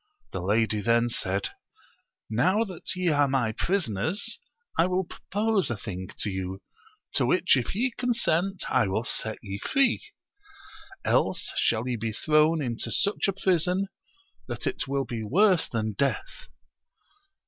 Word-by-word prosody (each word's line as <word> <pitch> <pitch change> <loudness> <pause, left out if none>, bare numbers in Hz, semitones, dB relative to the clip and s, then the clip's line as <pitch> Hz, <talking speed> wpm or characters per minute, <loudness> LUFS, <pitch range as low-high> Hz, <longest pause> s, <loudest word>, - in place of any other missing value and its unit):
The - - -4
lady 105 +2 +1
then 115 +3 +3
said, 100 -3 -1 0.8
Now 185 - +2
that 185 -4 -5
ye 180 -1 +1
are 145 -2 +3
my 130 -4 +1
prisoners 175 - -1 0.4
I 165 - +4
wiU 185 -1 0
propose 210 +1 -1
a 120 - -2
thing 95 -3 -6
to 105 - 0
you, 95 0 -4 0.5
to - - +2
which - - +4
if - - -2
ye 250 +5 +1
consent 195 -7 +1
I 110 - +3
will 95 +4 0
set 110 -2 -2
ye 100 -1 -5
free; 270 - +2 1.0
else - - +1
shall 115 +2 +1
ye 125 -2 -1
be 110 0 -3
thrown 155 +4 +3
into 120 -3 -3
such 200 0 +1
a. 195 - +1
prison 185 0 +1 0.6
that - - -5
it 370 - -2
will 135 0 0
be 120 -2 -4
worse 180 - +3
than 110 -2 -1
death. - - -2
140 Hz, 150 wpm, -27 LUFS, -, 1.0 s, I